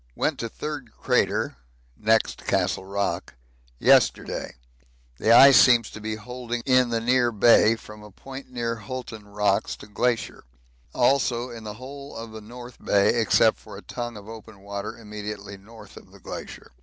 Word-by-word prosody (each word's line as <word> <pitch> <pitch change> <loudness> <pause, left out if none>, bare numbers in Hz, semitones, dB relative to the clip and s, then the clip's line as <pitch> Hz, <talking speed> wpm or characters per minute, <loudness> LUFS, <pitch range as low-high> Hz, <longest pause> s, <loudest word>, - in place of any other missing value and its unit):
Went - - -1
to 115 - -3
Third 145 -3 -6
Crater - - 0 0.4
(next 110 +6 0
Castle 95 - 0
Rock) 100 -6 -3 0.4
yesterday. - - +2 0.6
The 110 - +2
ice 135 +3 +9
seems 120 -3 +4
to 110 - -9
be 110 0 -3
holding 120 +1 -6
in 130 -2 +4
the 115 -1 0
near 120 +1 +2
Bay 115 0 +5
from 105 -1 -13
a 105 - -12
point 135 +7 -10
near 120 -2 -3
Hulton 110 -1 -8
Rocks 105 0 0
to - - -13
Glacier; 115 +3 -2 0.5
also 125 -1 +1
in 115 -2 -9
the 105 -1 -6
whole 140 +4 -10
of 115 0 -8
the 110 0 -9
North 120 +3 -12
Bay 100 -1 +3
except 110 - +3
for - - -11
a - - -11
tongue 120 -2 -6
of 105 0 -12
open 110 -2 -11
water 100 +2 -6
immediately 105 -2 -7
north 110 +3 -15
of - - -14
the - - -16
Glacier. - - -9
115 Hz, 165 wpm, -25 LUFS, 105-125 Hz, 0.6 s, ice